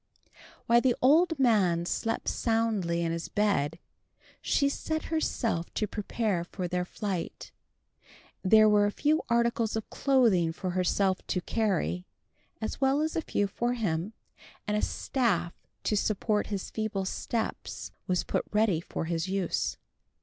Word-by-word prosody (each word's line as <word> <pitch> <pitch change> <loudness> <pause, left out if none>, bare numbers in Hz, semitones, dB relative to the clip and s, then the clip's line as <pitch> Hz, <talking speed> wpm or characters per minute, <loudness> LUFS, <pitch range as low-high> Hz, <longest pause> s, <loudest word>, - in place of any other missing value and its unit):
While 235 -1 +5
the 250 -1 +3
old 320 +5 +4
man 195 -10 +3
slept 225 +5 -2
soundly 215 -7 0
in 165 - 0
his 165 0 -3
bed, 165 -7 +1 0.6
she 280 - +2
set 315 +2 -2
herself 230 - -1
to 215 - +1
prepare 210 -3 -2
for 180 +1 -5
their 180 0 -1
flight. 190 -2 -4 0.9
There 215 +3 +6
were 205 -1 +5
a - - -1
few 305 +7 +1
articles 235 -1 +1
of 220 - -3
clothing 225 -12 +3
for 185 +2 -3
herself 185 +1 +1
to 180 - -1
carry, 170 - -1 0.5
as 220 - -4
well 270 +2 +3
as 315 +1 -1
a 330 - +1
few 205 - 0
for 240 +5 -1
him; 195 -3 -2 0.5
and 210 - 0
a 210 - +1
staff 185 -10 0 0.3
to 215 - +1
support 210 +1 0
his 200 -3 -4
feeble 215 -3 -2
steps 225 +4 -3 0.2
was 180 -1 +1
put - - -1
ready 210 -6 +2
for 165 - -4
his 165 +1 -1
use. 190 -2 -1
210 Hz, 145 wpm, -29 LUFS, 180-235 Hz, 0.9 s, There